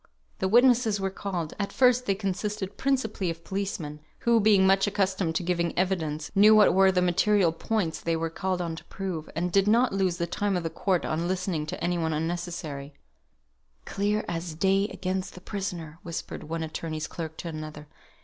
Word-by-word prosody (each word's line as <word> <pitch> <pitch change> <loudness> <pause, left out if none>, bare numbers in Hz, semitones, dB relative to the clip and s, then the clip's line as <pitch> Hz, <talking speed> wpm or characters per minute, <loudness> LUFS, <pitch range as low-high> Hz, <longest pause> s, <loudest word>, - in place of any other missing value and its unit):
The 190 - +1
witnesses 235 -1 +4
were 195 0 -1
called. 180 -5 -4
At 200 - -2
first 250 -1 +3
they 195 - +2
consisted 200 0 -3
principally 225 -9 0
of 165 0 -6
policemen; 190 -6 -4 0.2
who, 235 -1 +4
being 205 -3 +5
much 195 +1 +4
accustomed 190 -4 0
to 175 - 0
giving 170 -1 -1
evidence, 160 -5 -1
knew 210 +2 +7
what 210 -1 +6
were 190 +1 +5
the 180 -1 +2
material 185 0 +3
points 165 -2 -2
they 165 0 0
were 165 0 -2
called 185 0 -2
on 165 -1 -3
to - - -9
prove, 185 -5 -5
and 175 +2 -1
did 195 +1 +3
not 235 +3 +4
lose 190 -3 +1
the 170 - 0
time 195 +3 -1
of 175 - -3
the 165 - -3
court 185 -3 0
in 165 +2 -1
listening 180 -4 -2
to - - -5
any 175 0 +1
thing 160 -1 0
unnecessary. 160 -3 -4 0.9
"Clear 210 +2 -1
as 165 -1 -4
day 195 +4 +2
against 185 -1 -3
the - - -9
prisoner," 175 -6 -5
whispered 170 -1 -6
one 165 +1 -3
attorney's 155 0 -4
clerk 160 -1 -6
to - - -6
another. 155 -1 -7
185 Hz, 190 wpm, -27 LUFS, 165-200 Hz, 0.9 s, knew